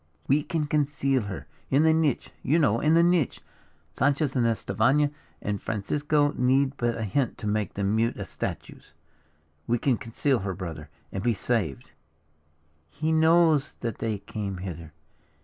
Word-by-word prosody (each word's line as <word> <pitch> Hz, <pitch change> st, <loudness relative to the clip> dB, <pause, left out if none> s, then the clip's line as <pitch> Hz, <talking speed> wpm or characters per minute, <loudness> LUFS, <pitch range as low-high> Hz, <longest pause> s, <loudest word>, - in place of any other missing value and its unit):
"We 140 Hz, +3 st, +3 dB
can 160 Hz, -1 st, -2 dB
conceal 140 Hz, -3 st, +1 dB
her. 100 Hz, -1 st, -6 dB, 0.2 s
In 140 Hz, +3 st, +4 dB
the 160 Hz, 0 st, +5 dB
niche, 160 Hz, -5 st, 0 dB
you 155 Hz, -, +2 dB
know, 115 Hz, -9 st, +3 dB
in 155 Hz, +4 st, +3 dB
the 170 Hz, -, +6 dB
niche. 175 Hz, -6 st, +2 dB, 0.5 s
Sanchez 140 Hz, +1 st, +1 dB
and 120 Hz, -2 st, +3 dB
Estefania 140 Hz, +5 st, +2 dB, 0.3 s
and 100 Hz, -1 st, -2 dB
Francisco 145 Hz, +7 st, 0 dB
need 130 Hz, +2 st, +2 dB
but 120 Hz, -1 st, 0 dB
a 115 Hz, -, -3 dB
hint 110 Hz, +4 st, -1 dB
to 120 Hz, -, -8 dB
make 105 Hz, -2 st, -1 dB
them 100 Hz, +1 st, 0 dB
mute 115 Hz, +1 st, +1 dB
as -, -, -6 dB
statues. -, -, -6 dB, 0.7 s
We 120 Hz, -, +2 dB
can 125 Hz, 0 st, +1 dB
conceal 120 Hz, +4 st, 0 dB
her, 95 Hz, -1 st, -3 dB
brother, 80 Hz, -4 st, -7 dB, 0.2 s
and 95 Hz, -, -3 dB
be 120 Hz, 0 st, +1 dB
saved." 100 Hz, -, -2 dB, 1.0 s
"He 155 Hz, -, -2 dB
knows 160 Hz, -2 st, +4 dB
that 115 Hz, -3 st, -3 dB
they 110 Hz, -2 st, -1 dB
came 100 Hz, -1 st, -5 dB
hither. 85 Hz, -3 st, -7 dB
125 Hz, 160 wpm, -26 LUFS, 105-150 Hz, 1.0 s, the